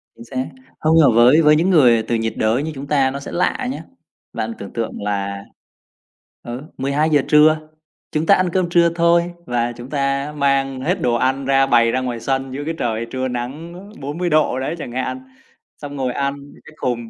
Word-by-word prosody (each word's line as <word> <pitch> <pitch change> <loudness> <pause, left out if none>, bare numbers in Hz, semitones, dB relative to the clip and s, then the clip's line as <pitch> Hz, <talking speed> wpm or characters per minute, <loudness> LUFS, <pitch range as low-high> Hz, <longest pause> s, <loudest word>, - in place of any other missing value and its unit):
Chính 115 - -12
xác. 130 +1 -4 0.3
Hông, 155 +1 +2
mà 145 - +6
với 125 +7 +6
với 150 -1 +5
những 170 +5 +2
người 125 -10 +5
từ 115 - -1
nhiệt 115 0 -1
đới 110 +5 +1
như 160 - -3
chúng 140 +1 -7
ta 135 -3 +2
nó 140 - -5
sẽ 140 - -8
lạ 245 +8 0
nhá. - - -6 0.5
Bạn 115 0 -3
tưởng 100 - -9
tượng 115 -3 -4
là 100 -1 -3 1.0
ờ, 120 +2 -7 0.2
12:00 145 +2 +1
trưa, 155 +1 +4 0.4
chúng 155 +1 -1
ta 200 - +6
ăn 185 -1 +1
cơm 180 0 0
trưa 170 -1 +4
thôi 170 +1 +2
và 120 -2 -1
chúng 120 +2 -10
ta 140 0 -1
mang 135 -2 +1
hết - - -1
đồ 120 - +1
ăn 130 +3 0
ra, 135 0 +3
bày 115 -3 +3
ra 130 - 0
ngoài 125 -2 -3
sân 135 +2 -2
dưới 145 +2 -5
cái 165 - -2
trời 115 -3 -2
trưa 130 0 -2
nắng 130 +7 -5 0.3
40 150 +6 -3
độ 155 -5 +2
đấy 140 +5 -3
chẳng 135 - -7
hạn, 130 +1 -3 0.6
xong 145 -1 -8
ngồi 130 -3 -2
ăn 140 0 -1
những 140 0 -15
cái - - -14
khùng. 120 -4 -3
135 Hz, 205 wpm, -19 LUFS, 120-155 Hz, 1.0 s, mà